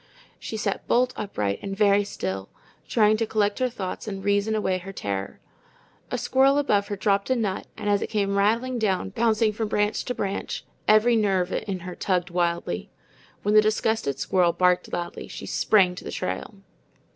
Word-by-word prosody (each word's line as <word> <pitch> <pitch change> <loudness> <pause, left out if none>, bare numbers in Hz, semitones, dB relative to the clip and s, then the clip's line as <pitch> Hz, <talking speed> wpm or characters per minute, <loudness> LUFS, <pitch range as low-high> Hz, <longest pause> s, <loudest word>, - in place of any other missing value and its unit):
She 220 - -5
sat 205 -2 -2
bolt 250 +1 +2
upright 105 - -2
and 195 -1 -5
very 205 -1 +4
still, 95 - -4 0.4
trying 215 -2 +3
to 225 0 -1
collect 210 0 0
her 255 -1 +1
thoughts 205 -3 -5
and 195 -2 -5
reason 205 +2 +2
away 190 -3 0
her 195 +2 -8
terror. 100 - -4 0.7
A - - -2
squirrel 270 +2 +3
above 205 -8 +2
her 205 - -3
dropped 200 +1 +1
a 260 - +3
nut, 210 -6 -2
and - - -5
as 205 -1 +2
it - - -3
came 200 -2 0
rattling 230 +5 +1
down, 195 -3 0
bouncing 220 0 +2
from 220 +1 -2
branch 210 0 0
to 250 - -3
branch, 195 -2 -3 0.2
every 215 +3 +5
nerve 195 -4 +1
in 190 -3 -3
her 180 0 -6
tugged 180 -1 -1
wildly. 170 - -1 0.5
When 205 - +1
the 215 - +8
disgusted 215 -9 0
squirrel 175 +4 +2
barked 180 -1 +2
loudly, 175 0 -4
she - - -8
sprang 190 -4 +3
to 180 - -9
the - - -6
trail. 95 - -4
205 Hz, 180 wpm, -25 LUFS, 185-220 Hz, 0.7 s, the